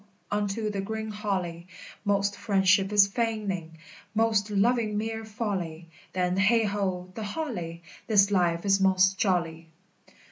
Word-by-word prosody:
unto 210 +1 -1
the 200 -1 -2
green 220 +2 -4
holly; 185 -5 -3 0.4
Most 200 -1 +1
friendship 195 -1 +2
is 205 -1 +7
feigning, 200 -6 -3 0.4
most 220 -2 +2
loving 210 +1 +1
mere 225 +1 -3
folly: 190 -7 -4 0.2
Then, 180 0 0
heigh 225 +4 +4
ho, 190 -3 -2
the 220 - -6
holly! 200 - -4 0.2
This 205 -2 +4
life 175 -2 +1
is 195 -1 +3
most 190 0 +3
jolly! 165 -4 0
200 Hz, 130 wpm, -27 LUFS, 185-215 Hz, 0.4 s, is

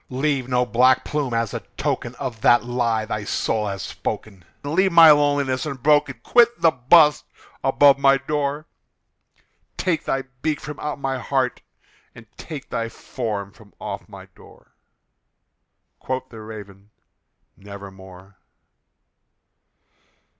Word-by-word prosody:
Leave 135 -1 -1
no 125 0 +2
black 125 +2 +3
plume 145 -4 -2
as 115 -2 -1
a - - -3 0.2
token - - -2
of 115 -3 -6
that 120 +2 +4
lie 120 -3 -1
thy 105 -1 -4
soul 105 +1 -1
hath 100 -4 -5
spoken! 95 -4 -6 0.2
Leave 185 +7 +1
my 165 -2 +9
loneliness 145 -3 +2
unbroken! 140 -2 +1
quit 240 -2 +4
the 165 -1 +4
bust 150 +4 +4 0.4
above 140 +1 +5
my 135 0 +5
door! 145 +1 -3 1.1
Take 170 -5 -1
thy 135 0 -1 0.2
beak 155 -2 -1
from 150 0 -8
out 150 -1 -4
my 135 -1 -2
heart, 130 0 -1 0.5
and 115 - -13
take 150 -5 -9
thy 115 0 -2
form 105 -5 -5
from 105 -1 -20
off 105 +1 -7
my 95 -2 -11
door!" - - -19 1.3
Quoth 130 0 -4
the 110 -2 -11
Raven, 105 -2 -11 0.7
"Nevermore." 95 -1 -13
130 Hz, 125 wpm, -22 LUFS, 110-145 Hz, 1.3 s, my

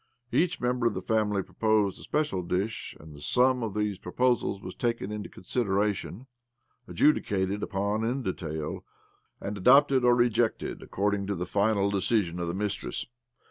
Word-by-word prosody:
Each 175 0 +1
member 125 -1 +1
of 110 - -1
the 95 - -3
family 105 -2 +1
proposed 110 -3 +1
a - - -12
special 150 -12 -1
dish, 95 +5 -3
and 75 0 -12
the 70 - -12
sum 125 - +3
of 110 -3 -3
these 105 -2 -1
proposals 120 0 0
was 90 -1 -8
taken 115 -4 -2
into 105 -1 -5
consideration, 105 +1 -2 0.6
adjudicated 100 - +1
upon 100 +2 -1
in 125 +4 -1
detail, 80 -6 -4 0.6
and 100 - -4
adopted 135 +4 +5
or 120 0 +5
rejected 120 -1 +1
according 100 0 -1
to 100 - -1
the 90 0 -3
final 100 0 +1
decision 95 -3 0
of 85 - -2
the. 85 - -2
mistress. 105 0 -3
105 Hz, 155 wpm, -28 LUFS, 95-120 Hz, 0.6 s, adopted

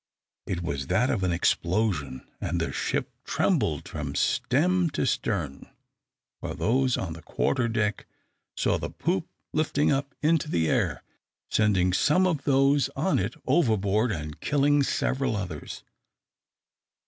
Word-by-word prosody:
It 90 -1 -2
was 70 -5 -3
that 110 +9 +2
of 110 -8 -1
an 90 -1 +1
explosion. 85 - 0
And 85 0 -1
the 80 - -1
ship - - -2
trembled - - 0
from 75 -2 -5
stem 175 +7 +2
to - - +1
stern, 85 - -2 0.7
while - - -5
those 130 +2 +1
on 80 -4 -3
the 80 - -10
quarter 125 - 0
deck 110 -2 -1 0.5
saw - - +1
the - - -4
poop 175 0 -1 0.3
lifting 150 -1 +1
up 140 0 -1
into 155 -1 +2
the 80 - +1
air, - - 0 0.5
sending 95 -4 +3
some 155 - +3
of 155 -7 -1
those 135 -1 +3
on 180 +7 +1
it - - -2
overboard, 110 - +2
and 75 -4 -5
killing 145 0 +3
several 135 -2 0
others. 90 -7 -6
115 Hz, 135 wpm, -27 LUFS, 90-140 Hz, 0.7 s, sending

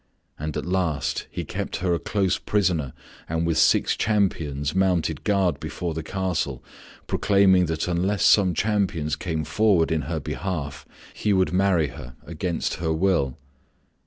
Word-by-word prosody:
And 75 +1 -3
at - - -3
last 90 -5 -1
he - - -5
kept - - -4
her 90 -1 0
a 85 - 0
close 95 +2 0
prisoner 85 -10 0 0.4
and 80 +1 0
with 85 -1 +1
six - - +4
companions 80 -9 0
mounted 90 -5 +1
guard 95 -7 +1
before 85 -2 -4
the 80 - -4
castle 95 +1 -2 0.4
proclaiming 95 -3 +3
that 80 +1 -2
unless 90 +3 +1
some 95 -4 +5
champions 90 -7 0
came 80 0 -3
forward 100 -4 +2
in 80 -1 +1
her 80 -2 -1
behalf 75 -1 -4 0.3
he 105 - 0
would 95 -1 +2
marry 90 -5 +2
her 65 0 -10
against 85 0 -3
her 80 -1 -1
will. 80 -6 +1
85 Hz, 150 wpm, -24 LUFS, 80-95 Hz, 0.4 s, some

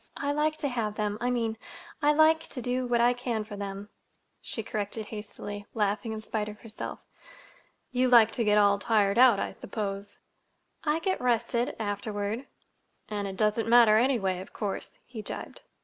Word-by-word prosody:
I 285 - -1
like 305 +1 +1
to 305 -2 -1
have 225 -5 -2
them—I 210 +3 -1
mean, 230 -3 -1 0.4
I 295 0 +5
like 315 +2 +4
to 260 - -6
do 250 +1 -1
what 240 -1 +2
I 240 +1 +5
can 240 -3 -2
for 210 -1 -8
them," 200 0 -6 0.5
she 225 - -5
corrected 210 +1 -3
hastily, 205 -1 -7
laughing 210 +1 0
in 220 0 -4
spite 215 -1 -2
of 210 - -11
herself. 225 -2 -7 0.9
"You 255 0 +2
like 230 -3 +7
to 235 - -1
get 210 -1 +4
all 200 -1 +5
tired 210 0 +2
out, 245 -5 +7
I - - -2
suppose." 200 -2 -5 0.7
"I 300 0 +2
get 375 +3 -1
rested—afterward." 225 -2 -1 0.6
"And 205 -2 -2
it 190 -1 -6
doesn't 215 +2 +1
matter, 230 -3 +7
anyway, 220 -8 +1
of 185 - -10
course," 205 -3 -4
he 235 -3 -7
gibed. - - -7
220 Hz, 165 wpm, -28 LUFS, 205-245 Hz, 0.9 s, like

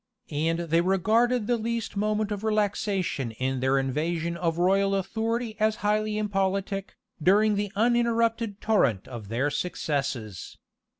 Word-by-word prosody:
And 160 +3 0
they 165 0 +2
regarded 215 +6 +2
the 240 +2 +1
least 230 0 -3
moment 210 +1 0
of 205 0 -3
relaxation 205 - 0
in 130 +3 -2
their 130 +1 +2
invasion 160 +5 -1
of 170 -1 -1
royal 195 +2 +3
authority 225 +3 -2
as 215 0 +2
highly 210 0 +1
impolitic, 195 -1 -1 0.3
during 210 +6 +4
the 205 -1 -1
uninterrupted 230 -1 +1
torrent 140 - +2
of 115 -5 -8
their 125 +7 0
successes. 135 - -3
195 Hz, 130 wpm, -27 LUFS, 160-215 Hz, 0.3 s, during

